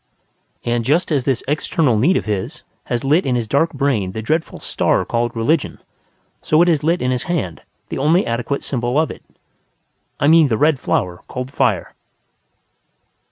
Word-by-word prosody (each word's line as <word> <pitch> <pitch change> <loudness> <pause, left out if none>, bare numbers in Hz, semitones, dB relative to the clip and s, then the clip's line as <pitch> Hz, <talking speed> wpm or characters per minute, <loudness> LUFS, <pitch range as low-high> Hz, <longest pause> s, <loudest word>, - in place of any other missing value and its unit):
And 120 0 0
just 155 +9 +1
as 140 -5 +1
this 130 -4 0
external 150 -2 +1
need 150 - +3
of - - -3
his 105 -3 -3 0.2
has 120 - -2
lit 150 +6 +3
in 130 -3 0
his 120 -2 -1
dark 145 +8 +1
brain 130 -10 -1
the 110 - -4
dreadful 160 +7 -1
star - - 0
called 120 0 -1
religion, 130 +8 0 0.6
so 155 - +2
it - - +1
has 155 -4 +1
lit 170 +1 +1
in 125 - +1
his 125 -1 -1
hand 140 - -2 0.3
the - - -4
only 160 +7 +3
adequate 120 +4 -2
symbol 125 +1 -1
of 160 - 0
it: - - -11 1.0
I - - +1
mean 160 0 +6
the 115 -4 0
red 150 0 +3
flower 90 -6 -1
called 130 +1 -5
Fire. 110 -10 0
135 Hz, 175 wpm, -19 LUFS, 115-155 Hz, 1.0 s, mean